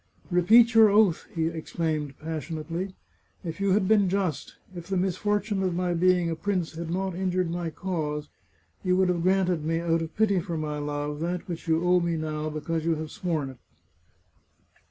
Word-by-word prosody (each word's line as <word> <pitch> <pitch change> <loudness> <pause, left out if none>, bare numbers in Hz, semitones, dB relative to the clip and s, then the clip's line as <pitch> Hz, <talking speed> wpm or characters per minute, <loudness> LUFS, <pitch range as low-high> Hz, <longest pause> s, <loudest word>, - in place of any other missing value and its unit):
" - - -36
Repeat 225 +7 +6
your 225 -1 +8
oath! 205 -4 +3
" - - -22
he 165 -1 +1
exclaimed 160 -3 -3
passionately. 165 +4 -4 0.2
" - - -39
If 165 +2 -5
you 195 -1 +3
had 195 -1 +2
been 205 -3 +4
just, 180 -7 -2 0.2
if 175 -1 -8
the 190 -1 -1
misfortune 200 +2 0
of 185 -2 0
my 180 0 0
being 180 0 +3
a 165 - -1
prince 180 -1 -1
had 165 0 -5
not 190 +2 -1
injured 185 -1 -1
my 175 -1 -2
cause, 155 -4 -3 0.6
you 180 -1 +2
would 190 -1 +3
have 175 -2 0
granted 185 -3 +2
me, 165 +1 0
out 165 -1 +1
of 165 0 -6
pity 200 -3 +3
for 170 -1 -4
my 150 -1 -3
love, 145 0 -3
that 175 +2 -3
which 170 -1 -6
you 165 +1 +2
owe 180 0 +4
me 170 -1 -1
now, 155 -1 -3
because 155 +1 -3
you 165 0 +1
have 155 0 -6
sworn 155 -7 -2
it." 130 - -15
170 Hz, 195 wpm, -27 LUFS, 160-185 Hz, 0.6 s, your